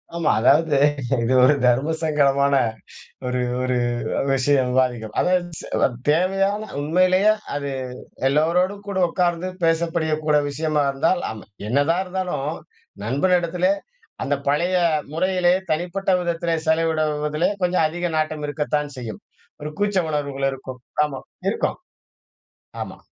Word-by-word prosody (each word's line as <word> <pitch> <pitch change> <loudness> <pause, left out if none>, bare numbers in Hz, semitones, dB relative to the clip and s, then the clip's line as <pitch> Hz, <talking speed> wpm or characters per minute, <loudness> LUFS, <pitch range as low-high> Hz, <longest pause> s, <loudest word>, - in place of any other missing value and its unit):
ஆமா 170 -2 +2
அதாவது 145 +5 +4 0.5
இது 120 +3 +1
ஒரு 135 +4 +6
தர்மசங்கடமான 140 +1 +2 0.7
ஒரு 125 0 -1 0.2
ஒரு 130 0 0 0.6
விஷயம் 135 -1 +2
விவாதிக்கும். 125 -4 0
அதாவது 180 -1 +2
ஸ் - - -8 0.4
தேவையான 195 +6 +2 0.2
உண்மையிலேயே 185 +6 +4 0.2
அது 140 -1 -3 0.6
எல்லோரோடும் 180 +8 +1
கூட 200 -1 -3
உட்கார்ந்து 175 0 0 0.2
பேசக்கூடிய 160 -2 +1
விஷயமாக 150 -1 0
இருந்தால், 165 +6 +1
ஆமா 110 - -9 0.2
என்னதான் 145 +9 +2
இருந்தாலும், 180 -5 -3 0.5
நண்பன் 140 - +2
இடத்திலே 175 +2 +1 0.5
அந்த 145 - +1
பழைய 170 +6 +1 0.4
முறையிலே 180 +1 +2 0.2
தனிப்பட்ட 175 +5 -1
விதத்திலே 170 -1 -1
செலவிடுவதிலே 155 -1 +1
கொஞ்சம் 180 -2 +2
அதிக 175 +2 -3
நாட்டம் 155 -1 -1
இருக்கத்தான் 150 0 -2
செய்யும். 115 -5 -7 0.4
ஒரு 150 - -4
கூச்ச 205 -1 +1
உணர்வுகள் 140 -2 -1
இருக்கும். 130 -1 -8 0.2
ஆமாம் 140 -3 -6 0.2
இருக்கும், - - -2 1.0
ஆமா - - -8
155 Hz, 110 wpm, -22 LUFS, 140-175 Hz, 1.0 s, ஒரு